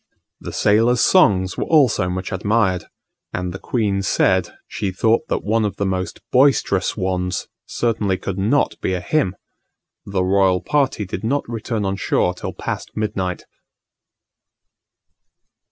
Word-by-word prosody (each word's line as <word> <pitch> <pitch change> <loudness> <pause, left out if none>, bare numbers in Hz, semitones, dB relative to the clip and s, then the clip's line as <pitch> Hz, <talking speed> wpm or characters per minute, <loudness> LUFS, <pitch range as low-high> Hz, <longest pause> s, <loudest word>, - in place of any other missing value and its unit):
The - - -7
sailors' 115 +3 +3
songs 95 -2 +4
were - - -1
also 135 - +3
much 95 +2 -4
admired; 100 -1 +1 0.5
and 90 -1 -3
the 95 - -7
queen 105 -5 -1
said 95 - +2 0.2
she 100 - -3
thought 110 +9 +1
that - - -2
one 110 +2 +1
of 100 -2 -2
the 100 - -2
most 95 -1 -3
boisterous 125 -9 +3
ones 90 -2 -2 0.2
certainly 105 -5 0
could 95 0 -4
not 115 +9 +1
be 95 - 0
a - - -2
hymn! 115 - 0 0.7
The 95 -2 0
royal 95 -1 +3
party 135 -7 0
did 95 +1 -6
not 140 +6 -1
return 115 -2 -3
on 95 0 -1
shore 90 -1 +1
till 90 - -6
past - - -5
midnight. 95 -4 -2
100 Hz, 140 wpm, -20 LUFS, 95-115 Hz, 0.7 s, songs